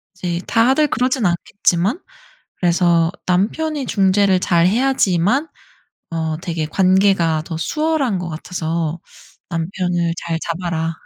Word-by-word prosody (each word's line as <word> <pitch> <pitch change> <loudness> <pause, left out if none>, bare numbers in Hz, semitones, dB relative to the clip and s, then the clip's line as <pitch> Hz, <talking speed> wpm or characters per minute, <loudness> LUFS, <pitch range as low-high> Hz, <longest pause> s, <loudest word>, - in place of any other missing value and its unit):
이제 175 -1 -3
다들 265 +6 +3
그러진 255 -1 0
않겠지만 180 - 0 0.6
그래서 170 -1 +2 0.2
남편이 270 - 0
중재를 195 -1 +3
잘 170 -1 +3
해야지만 240 - +2 0.6
어 160 -1 -2
되게 165 -3 -3
관계가 185 -2 +2
더 165 - -5
수월한 300 - 0
것 180 -1 -4
같아서 165 0 -3 0.5
남편을 175 0 -1
잘 165 -1 -3
잡아라. 165 -1 -3
180 Hz, 250 characters per minute, -19 LUFS, 170-210 Hz, 0.6 s, 다들